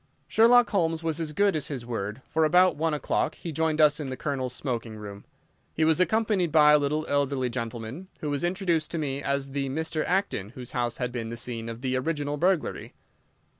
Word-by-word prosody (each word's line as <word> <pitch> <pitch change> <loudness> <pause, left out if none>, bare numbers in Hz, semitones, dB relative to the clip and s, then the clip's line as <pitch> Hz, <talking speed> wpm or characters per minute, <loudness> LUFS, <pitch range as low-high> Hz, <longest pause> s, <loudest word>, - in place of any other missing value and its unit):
Sherlock 235 0 +5
Holmes 165 -4 0
was 160 0 -1
as 155 -2 -3
good 200 +4 +2
as 150 - -1
his 130 -5 -5
word, 110 0 -4
for 160 - +1
about 180 +3 +5
one 160 0 0
o'clock 150 - -1
he 170 - -7
rejoined 160 0 0
us 150 0 +5
in 145 -3 -4
the 130 - -5
Colonel's 130 -3 -2
smoking 115 -4 -4
room. 100 -1 -9 0.5
He 160 - +2
was 160 +1 +3
accompanied 205 -3 +2
by 150 -1 +6
a 150 - +6
little 150 +2 -1
elderly 140 -3 0
gentleman, 115 +7 -5
who 150 - -3
was 145 +2 -2
introduced 175 -3 0
to 170 - -3
me 140 -3 -2
as 140 -1 -1
the 135 -1 -2
Mr. 160 +2 -2
Acton 175 - -1
whose 125 -2 -7
house 120 -1 -1
had 125 -1 -2
been 115 -2 -4
the 115 - -5
scene 115 -1 -4
of 115 +1 -7
the 130 -1 -1
original 145 +1 -1
burglary. 180 +1 0
145 Hz, 205 wpm, -27 LUFS, 125-165 Hz, 0.5 s, by